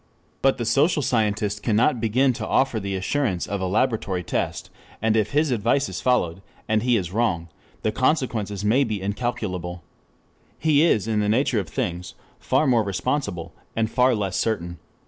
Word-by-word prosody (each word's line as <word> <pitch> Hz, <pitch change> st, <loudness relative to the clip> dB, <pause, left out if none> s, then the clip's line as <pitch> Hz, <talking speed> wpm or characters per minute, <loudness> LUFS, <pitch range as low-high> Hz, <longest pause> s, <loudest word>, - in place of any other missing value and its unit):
But 135 Hz, 0 st, +3 dB
the 120 Hz, -, -3 dB
social 145 Hz, +7 st, +2 dB
scientist 105 Hz, -3 st, 0 dB
cannot 115 Hz, +3 st, +2 dB
begin 125 Hz, +4 st, +2 dB
to -, -, -5 dB
offer 130 Hz, -4 st, +2 dB
the 100 Hz, -1 st, -3 dB
assurance 95 Hz, -1 st, -1 dB
of 100 Hz, -2 st, -3 dB
a 95 Hz, -, 0 dB
laboratory 105 Hz, -3 st, 0 dB
test, -, -, -3 dB, 0.3 s
and 110 Hz, 0 st, +1 dB
if 110 Hz, -2 st, +2 dB
his 150 Hz, +2 st, +1 dB
advice 120 Hz, +5 st, +1 dB
is -, -, -5 dB
followed, 95 Hz, -9 st, +1 dB, 0.3 s
and 110 Hz, 0 st, +2 dB
he 120 Hz, 0 st, +3 dB
is 90 Hz, -4 st, -3 dB
wrong, 95 Hz, -6 st, 0 dB, 0.3 s
the 110 Hz, -, +1 dB
consequences 115 Hz, -, 0 dB
may 125 Hz, +7 st, +4 dB
be 110 Hz, -5 st, -2 dB
incalculable. 95 Hz, -4 st, -3 dB, 0.7 s
He 150 Hz, -2 st, +3 dB
is 115 Hz, -, +3 dB
in 110 Hz, -1 st, +1 dB
the 105 Hz, 0 st, +1 dB
nature 120 Hz, 0 st, +2 dB
of 90 Hz, -5 st, -5 dB
things 90 Hz, +4 st, -4 dB, 0.2 s
far 155 Hz, -, +1 dB
more 125 Hz, -4 st, +4 dB
responsible, 100 Hz, -, -2 dB, 0.2 s
and 110 Hz, -1 st, 0 dB
far 125 Hz, 0 st, +3 dB
less 100 Hz, -3 st, -2 dB
certain. 85 Hz, -6 st, -2 dB
110 Hz, 170 wpm, -24 LUFS, 95-125 Hz, 0.7 s, may